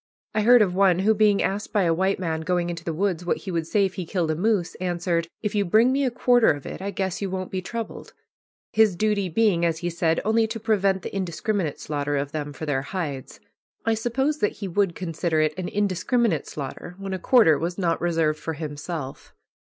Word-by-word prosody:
I 215 - +1
heard 240 +1 +7
of 185 -3 -1
one 190 -2 +4
who, 205 +4 +3
being 210 -1 +3
asked 200 +2 -2
by 205 -3 +2
a 165 -2 +3
white 190 +3 +1
man 160 -3 -2
going 175 +1 0
into 170 -1 -7
the 165 - -2
woods 180 +1 -1
what 175 - 0
he 195 - -7
would 165 -2 -2
say 200 +3 +2
if 190 - -3
he 185 - -4
killed 170 -4 0
a - - -1
moose, 190 0 0
answered, 175 -2 -1 0.2
"If 210 - -1
you 205 -1 +2
bring 220 +7 +4
me 275 +1 +1
a - - +2
quarter 245 -1 +3
of 145 -2 -1
it - - -7
I 195 - -3
guess 190 -1 -3
you 200 - -2
won't 185 0 -4
be 185 - -2
troubled." 230 +4 -6 0.6
His 220 -4 +4
duty 205 -1 0
being, 185 -2 +2
as 165 -1 +1
he 175 - 0
said, 165 -1 +1
only 220 +1 +3
to 225 +1 -5
prevent 200 -4 +1
the - - -6
"indiscriminate" 185 -2 -2
slaughter 145 -1 -2
of 140 0 -2
them 150 -1 -4
for 145 +3 -7
their 140 -3 0
hides. 140 -4 -5 0.5
I 225 - +3
suppose 265 +7 -1
that 210 - +1
he 200 - -6
would 190 -1 0
consider 165 -2 -1
it 155 0 +2
an 185 0 -4
indiscriminate 205 - 0
slaughter 150 +5 -7
when 195 -1 -5
a 190 - -3
quarter 185 - +5
was 175 +2 -3
not 170 -4 0
reserved 165 -3 +1
for 160 - -4
himself. 150 -1 -6
185 Hz, 225 wpm, -24 LUFS, 165-210 Hz, 0.6 s, heard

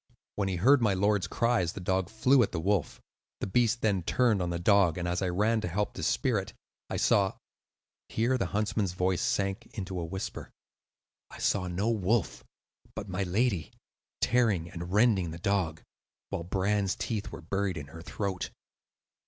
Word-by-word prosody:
When 100 -2 0
he 95 - -1
heard 130 +10 +5
my 105 -4 +3
lord's 100 0 +2
cries, 115 -8 +1
the - - -7
dog 95 0 0
flew 125 +5 +4
at 115 - +1
the 85 - -2
wolf. 95 0 0 0.4
The - - -2
beast 120 +3 +2
then 100 -4 +2
turned 110 +2 +2
on 90 - -1
the 85 - -2
dog, 90 -1 +4
and 90 -1 -2
as 90 +1 -1
I 95 - 0
ran 110 +5 +1
to 105 - -2
help 100 +4 -1
to - - -7
spear - - +1
it, - - -7 0.4
I - - -2
saw—" 100 -2 +3 0.8
here 120 +4 +1
the - - 0
huntsman's 105 -2 -1
voice 90 0 0
sank 100 -1 -1
into 95 -2 -4
a - - -2
whisper—"I 95 +3 -10
saw 95 -2 0
no 95 +6 0
wolf, 105 -3 0 0.5
but 105 -2 -6
my 90 +2 -2
lady, 95 -1 0 0.5
tearing 105 -9 +2
and 85 0 -6
rending 105 -4 +3
the 80 - -6
dog, 85 -4 -1 0.5
while 85 - -4
Bran's 95 +1 0
teeth 110 -3 -3
were - - -8
buried 95 +1 -1
in 75 - -5
her 80 +3 -10
throat. 95 +1 -3
95 Hz, 175 wpm, -29 LUFS, 90-105 Hz, 0.8 s, heard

